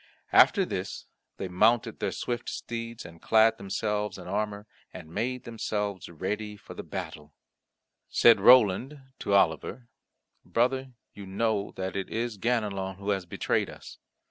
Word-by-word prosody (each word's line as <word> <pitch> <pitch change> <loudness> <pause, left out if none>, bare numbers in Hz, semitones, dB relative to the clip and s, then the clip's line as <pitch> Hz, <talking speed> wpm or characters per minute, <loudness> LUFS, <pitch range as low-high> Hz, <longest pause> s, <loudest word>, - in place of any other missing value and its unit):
After - - +6
this - - -5 0.3
they 95 - -4
mounted 110 +6 +2
their - - -1
swift 120 -1 -3
steeds, 115 -1 -6
and 85 0 -12
clad 110 0 +4
themselves 105 +1 -2
in 90 -1 -10
armour, 105 +1 -2 0.3
and 80 +1 -11
made 125 +4 -2
themselves 105 -4 -3
ready 105 +5 -4
for - - -12
the - - -6
battle. 75 0 -7 0.7
Said 115 - +6
Roland 125 +4 +5 0.2
to 100 - -1
Oliver, 100 +7 +1 0.5
"Brother, 130 +2 0 0.2
you 100 -1 -10
know 100 +1 -1
that 95 0 -4
it 100 -1 -3
is 115 -2 -3
Ganelon 100 -5 -1
who 100 +1 -3
has 95 -3 -2
betrayed - - 0
us. - - -12
105 Hz, 145 wpm, -28 LUFS, 95-115 Hz, 0.7 s, After